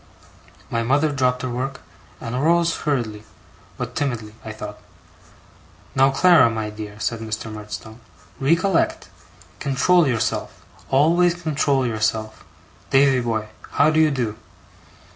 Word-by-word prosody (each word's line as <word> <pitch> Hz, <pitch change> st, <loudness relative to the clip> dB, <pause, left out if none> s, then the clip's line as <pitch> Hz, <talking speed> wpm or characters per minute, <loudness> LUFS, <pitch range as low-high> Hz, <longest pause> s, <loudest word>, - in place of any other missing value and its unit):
My 115 Hz, -, 0 dB
mother 140 Hz, +6 st, +2 dB
dropped 125 Hz, -2 st, 0 dB
her 130 Hz, -, -2 dB
work, 130 Hz, +2 st, -4 dB, 0.4 s
and 115 Hz, -2 st, -6 dB
arose 170 Hz, +5 st, +2 dB
hurriedly, 120 Hz, -8 st, -2 dB, 0.5 s
but -, -, -5 dB
timidly 115 Hz, -7 st, -2 dB
I 110 Hz, -, -6 dB
thought. 105 Hz, -1 st, -8 dB, 1.1 s
'Now, 135 Hz, +1 st, +4 dB
Clara 145 Hz, -2 st, +5 dB
my 110 Hz, -2 st, -3 dB
dear,' 105 Hz, -1 st, -8 dB
said 115 Hz, +1 st, -2 dB
Mr. 110 Hz, 0 st, -5 dB
Murdstone. 110 Hz, +1 st, -8 dB, 0.4 s
'Recollect! 195 Hz, -, +1 dB, 0.5 s
control 150 Hz, +5 st, +3 dB
yourself, 115 Hz, -4 st, -2 dB, 0.2 s
always 170 Hz, +6 st, +4 dB
control 145 Hz, -5 st, 0 dB
yourself! 110 Hz, -1 st, -2 dB, 0.5 s
Davy 135 Hz, -1 st, +4 dB
boy, 110 Hz, -2 st, -2 dB, 0.2 s
how 150 Hz, +2 st, +4 dB
do 155 Hz, -, +2 dB
you 155 Hz, -1 st, +5 dB
do? 120 Hz, -6 st, -2 dB
130 Hz, 125 wpm, -22 LUFS, 110-150 Hz, 1.1 s, Clara